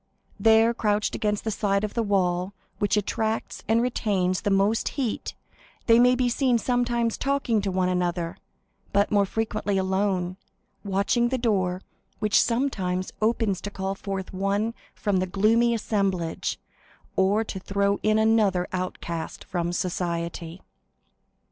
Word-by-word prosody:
There, 225 +1 +5
crouched 210 -2 0
against 210 -1 -1
the 220 - -1
side 200 -1 0
of 210 - -2
the 235 - 0
wall 185 -3 0 0.3
which 205 +1 +1
attracts 220 +2 -2
and 230 +2 +3
retains 195 -7 0
the 205 - 0
most 200 +3 +2
heat, 250 -6 -2 0.5
they 230 0 +6
may 250 +1 +5
be 250 0 +1
seen 245 0 +2
sometimes 240 -1 0
talking 270 -6 +1
to 200 - -2
one 185 0 +1
another, 175 -1 -1 0.6
but 200 +1 +2
more 200 -2 +3
frequently 210 -2 -1
alone, 190 -1 0 0.5
watching 200 +5 +1
the 260 - 0
door, 190 -6 0 0.3
which 210 -1 +3
sometimes 195 -8 -1
opens 215 -3 +1
to 205 - -4
call 195 -1 -3
forth 195 -1 -5
one 200 +4 0 0.2
from 205 -3 0
the 185 0 0
gloomy 220 +5 +3
assemblage, 195 -6 -1 0.6
or 200 +3 +3
to 200 -3 -6
throw 200 +1 0
in 215 0 +3
another 215 -5 +3
outcast 170 -2 -4
from 175 -2 -2
society. 170 -1 -3
200 Hz, 140 wpm, -25 LUFS, 185-225 Hz, 0.6 s, they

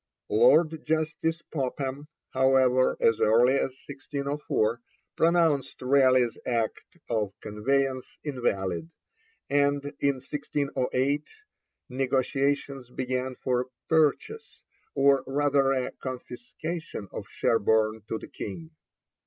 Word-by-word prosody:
Lord 165 - +4
Justice 160 +1 -1
Popham, 135 0 -4 0.2
however, 130 -1 +3
as 115 -1 +3
early 120 +4 +5
as 135 -1 -1
1604, 140 -5 -2 0.3
pronounced 165 -5 +2
Raleigh's 130 -2 +3
act 115 -3 -1 0.3
of 105 -4 -1
conveyance 130 +5 -1
invalid, 95 - -2 0.6
and 140 0 +2 0.2
in 140 -1 +2
1608 140 0 -2 0.6
negotiations 135 0 -1
began 130 0 -3
for 125 -1 +1
a - - -4 0.2
'purchase,' 160 - 0 0.3
or 140 -1 +4
rather 140 0 +2
a 130 -2 -1
confiscation 155 - -6
of - - -7
Sherborne 110 0 +1
to 110 - -2
the - - -10
King. 160 +11 -7
135 Hz, 95 wpm, -27 LUFS, 125-145 Hz, 0.6 s, early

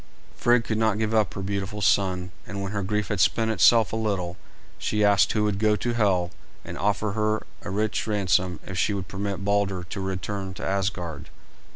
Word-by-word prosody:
Frigg 120 -1 +3
could 110 -1 -2
not 110 -2 +2
give 110 0 -1
up 110 -2 +2
her 95 - -4
beautiful 100 +1 -3
son, 95 -3 +1 0.2
and 100 0 -5
when 100 0 -3
her 105 -1 -2
grief 105 +1 -1
had 105 - -1
spent 110 +6 +3
itself 110 0 +5
a - - +1
little, 100 -6 -1 0.4
she 105 -1 0
asked 100 -1 +4
who 105 - +1
would 105 -2 0
go 105 0 +3
to 120 +3 -2
Hel 95 -6 +2 0.3
and - - -6
offer 105 +1 0
her 110 +1 0 0.2
a - - -6
rich 105 +3 -1
ransom 95 -4 +1
if 95 -1 -4
she 100 - +1
would 95 -3 -4
permit 100 0 -4
Balder 100 -3 +1
to 95 +3 -6
return 95 0 -4
to - - -6
Asgard. 95 -6 -2
100 Hz, 200 wpm, -25 LUFS, 95-105 Hz, 0.4 s, itself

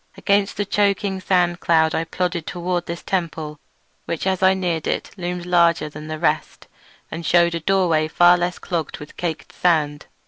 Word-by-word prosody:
Against 200 -1 +1
the 205 - 0
choking 200 -1 0
sand 175 -2 +1
cloud 160 -1 +3
I 165 - -1
plodded 175 -1 -2
toward 175 0 -2
this 170 0 -5
temple, 160 -5 -3 0.5
which 170 - -3
as 190 -1 0
I 190 0 +5
neared 175 -4 -2
it - - -2
loomed 175 -1 -4
larger 170 -3 +3
than 150 +1 -9
the 155 0 -4
rest, - - -1 0.5
and 170 - -5
shewed 170 0 +3
a 170 - -2
doorway 165 -3 +2
far 175 +2 +5
less 175 0 -2
clogged 170 -4 -4
with 150 - -11
caked 165 -3 -4
sand. 150 -4 +1
175 Hz, 175 wpm, -21 LUFS, 160-185 Hz, 0.5 s, I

